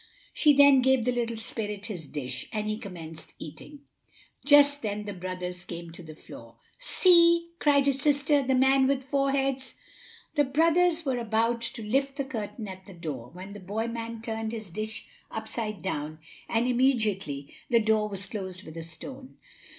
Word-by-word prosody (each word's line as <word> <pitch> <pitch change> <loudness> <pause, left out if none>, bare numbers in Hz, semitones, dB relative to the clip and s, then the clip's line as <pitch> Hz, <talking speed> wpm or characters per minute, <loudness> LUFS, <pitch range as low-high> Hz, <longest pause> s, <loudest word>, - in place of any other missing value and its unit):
She 300 -2 +5
then 280 -1 +7
gave 260 -2 +3
the 250 - +2
little 235 -2 -1
spirit 210 -2 -4
his 175 -9 -6
dish, 130 -4 -4
and 215 -1 -2
he 215 0 -2
commenced 165 -7 -8
eating. 160 - -9 0.6
Just 285 -1 +6
then 210 -1 -3
the 205 - -4
brothers 180 -1 -5
came 170 -1 -7
to 170 - -9
the 155 -2 -11
door. - - -12 0.2
"See!" 340 -7 +5
cried 280 -2 +4
the 280 - +4
sister, 285 +1 +2
"the 265 -1 +1
man 265 +1 +4
with 270 -1 +1
four 275 +1 +1
heads!" 270 -1 -1 0.6
The 295 -2 +3
brothers 330 +4 +3
were 260 -3 0
about 230 +1 +1
to 230 -1 -4
lift 270 +5 0
the 275 -1 -2
curtain 225 -3 -5
at 190 -1 -9
the 195 - -11
door, 150 -8 -6
when 185 +3 -9
the 205 - -8
boy 205 +4 -3
man 230 -1 -5
turned 225 -1 -3
his 215 -5 -6
dish 215 +4 -5 0.2
upside 220 -1 -4
down, 155 -4 -3 0.3
and 230 +1 +1
immediately 215 - +1 0.2
the 235 -2 +5
door 215 -1 +2
was 195 -1 -3
closed 190 -2 -6
with 160 -2 -10
a 165 - -5
stone. 260 +11 -9
225 Hz, 175 wpm, -28 LUFS, 190-270 Hz, 0.6 s, then